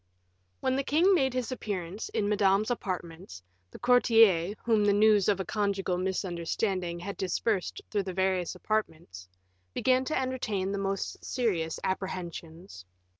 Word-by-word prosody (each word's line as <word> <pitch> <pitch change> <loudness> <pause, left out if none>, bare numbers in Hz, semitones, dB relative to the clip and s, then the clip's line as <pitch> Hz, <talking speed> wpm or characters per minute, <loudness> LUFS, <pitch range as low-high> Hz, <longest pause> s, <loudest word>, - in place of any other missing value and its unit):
When 260 - +1
the 275 - 0
king 335 +8 +4
made 265 -7 +2
his 255 -1 -2
appearance 200 -5 -4
in 205 - -1
Madame's 205 +1 +2
apartments, 175 - -5 0.3
the - - -11
courtiers, 225 -7 +4
whom 220 -3 +3
the 205 -1 +4
news 210 -1 +4
of 200 -2 +2
a 190 - -2
conjugal 200 -4 -1
misunderstanding 180 -1 -2
had 200 +3 -6
dispersed 190 +1 -1
through 205 -3 0
the 190 - -3
various 190 -1 0
apartments, 160 - -3 0.5
began 255 0 +2
to 310 - -1
entertain 230 -7 -2
the 200 - -2
most 195 0 -3
serious 180 -11 -1
apprehensions. 175 - -5
195 Hz, 140 wpm, -29 LUFS, 180-220 Hz, 0.5 s, king